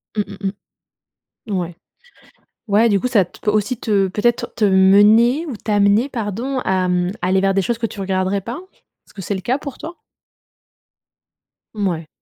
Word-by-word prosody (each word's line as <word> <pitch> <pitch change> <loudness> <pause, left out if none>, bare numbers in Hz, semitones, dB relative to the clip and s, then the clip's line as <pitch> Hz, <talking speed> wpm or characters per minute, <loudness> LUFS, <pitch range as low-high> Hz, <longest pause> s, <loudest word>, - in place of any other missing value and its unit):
Mmh, 210 - +1 0.2
mmh, 195 - 0 1.0
mmh. 205 - -2
Ouais. 175 -1 -5 0.9
Ouais, 215 +3 +4
du 200 -2 +2
coup, 250 - -1
ça 210 -7 +3
t 180 - -19
peut 210 - +1
aussi 215 +4 0
te, 200 -3 +1
peut-être 230 +5 -1
te 220 - -2
mener 205 - +5
ou 260 -7 -5
t'amener, 205 +3 +2
pardon, 240 +2 -3
à, 185 -1 0
mmh, 180 0 0
aller 185 +2 +2
vers 195 0 +2
des 195 - +2
choses 235 +4 -1
que 230 - -1
tu 205 - -11
regarderais 190 +1 -1
pas? 235 - -6 0.5
Est-ce - - -22
que 195 - -8
c'est 195 - -3
le 190 - -5
cas 250 +7 0
pour 280 -3 -8
toi? 335 +2 -9 1.8
Mouais. 175 -6 -2
205 Hz, 175 wpm, -19 LUFS, 190-235 Hz, 1.8 s, mener